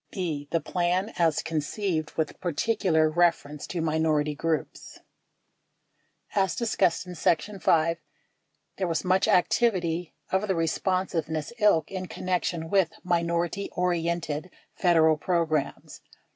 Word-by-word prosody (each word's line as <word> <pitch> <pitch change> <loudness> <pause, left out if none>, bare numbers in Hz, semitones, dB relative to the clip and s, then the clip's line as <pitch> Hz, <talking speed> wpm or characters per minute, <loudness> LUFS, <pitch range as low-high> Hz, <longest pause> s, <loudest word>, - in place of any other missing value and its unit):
42 - - -7
B. 150 -5 -3
The 165 - 0
Plan 180 +6 -1
as 165 -3 +2
Conceived 160 +1 -2
With 160 -2 -2
Particular 175 -2 +1
Reference 155 -3 0
to 175 - -3
Minority 155 -1 +1
Groups 160 +1 -3 1.4
As 190 -4 +1
discussed 190 -7 +1
in 180 - -8
section 180 +4 0
Y, 165 +1 +3 0.8
there 190 - -1
was 165 +2 -1
much 185 +1 +3
activity 180 -4 +1 0.2
of 190 +3 +1
the 190 - +1
respon 185 +3 0
siveness 160 +2 -3
ilk 185 -8 +3
in 185 -1 -4
connection 175 -3 -2
with 190 -4 +3
minority 170 +2 0
oriented 170 -2 -1 0.2
Federal 160 -4 +4
programs. 160 -3 -1
170 Hz, 120 wpm, -27 LUFS, 160-185 Hz, 1.4 s, Federal